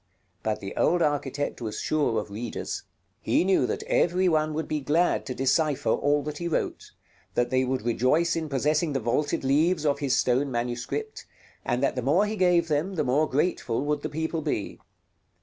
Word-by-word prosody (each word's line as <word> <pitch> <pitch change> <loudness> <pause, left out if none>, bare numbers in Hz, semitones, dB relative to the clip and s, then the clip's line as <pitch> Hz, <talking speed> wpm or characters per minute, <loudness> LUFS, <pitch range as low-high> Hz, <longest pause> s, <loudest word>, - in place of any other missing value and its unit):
But 110 -1 -2
the 95 - -6
old 175 -1 +2
architect 145 -2 -1
was 110 -2 -4
sure 145 -8 +1
of 105 -1 -7
readers. 115 +3 -4 0.4
He - - +2
knew 190 0 +3
that - - -3
every 180 +2 +2
one 155 -2 +1
would 160 - -2
be 155 - -1
glad 160 +5 +1
to 130 - -4
decipher 145 +2 +1
all 145 0 +2
that 150 0 -5
he 170 - -2
wrote; 165 - -2 0.5
that 120 - +1
they 130 0 +3
would 130 -2 -1
rejoice 130 +8 +2
in 160 -2 -3
possessing 150 +3 +1
the 135 - 0
vaulted 135 +6 -1
leaves 155 +4 +2
of 145 -1 +1
his 140 -3 +1
stone 130 +3 +2
manuscript; 125 - -4 0.4
and 125 +1 -1
that 140 - +1
the 125 - -1
more 155 - +3
he 215 +1 -3
gave 180 -3 +3
them, 160 +5 -1
the - - +1
more 145 +5 +2
grateful 135 -4 0
would 150 0 0
the 155 - -3
people 160 +2 -2
be. 145 -9 -3
145 Hz, 190 wpm, -26 LUFS, 130-160 Hz, 0.5 s, knew